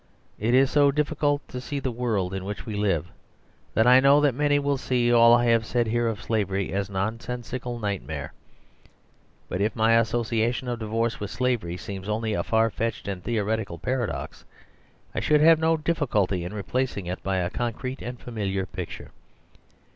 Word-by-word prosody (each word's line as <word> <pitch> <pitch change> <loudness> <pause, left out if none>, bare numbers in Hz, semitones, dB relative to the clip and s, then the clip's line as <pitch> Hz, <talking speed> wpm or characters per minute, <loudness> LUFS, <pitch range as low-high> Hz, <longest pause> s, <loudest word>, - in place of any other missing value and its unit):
It 115 +4 +2
is 135 0 +4
so 145 -1 +5
difiicult 145 0 0
to 125 - -6
see 140 +2 -4
the 130 -2 -2
world 110 -6 -1
in 95 -1 -4
which 100 +2 -6
we 110 - -5
live, 95 -6 0 0.6
that 110 - +4
I 125 +1 +8
know 140 +2 +6
that 145 -3 +3
many 145 +2 +2
will 140 -1 0
see 120 -2 +1
all 115 0 +7
I 120 0 +2
have 115 -1 +3
said 120 +1 0
here 120 +1 0
of 115 +1 -3
slavery 100 -4 -1
as 100 0 -1
a - - -11
nonsensical 120 +4 -3
nightmare. 80 -9 -4 1.1
But 90 - -3
if 105 +1 0
my 110 0 +3
associ 115 0 +2
ation 120 +2 -1
of 120 -1 -3
divorce 115 +1 -1
with 105 - -4
slavery 120 -10 -1
seems 95 +1 -7
only 110 0 -1
a - - 0
far 110 0 +2
fetched 115 +1 -3
and 95 -3 -4
theoretical 110 -4 -1
paradox, 120 +7 -3 0.7
I - - -1
should 150 -1 +3
have 160 0 +7
no 160 0 +2
difiiculty 120 - 0
in 90 - -5
replacing 105 0 -2
it 90 +2 -4
by 95 -1 -1
a 90 -1 -1
concrete 120 +2 -4
and 125 0 -6
familiar 100 -5 -3
picture. 90 -2 -7
115 Hz, 185 wpm, -25 LUFS, 100-125 Hz, 1.1 s, I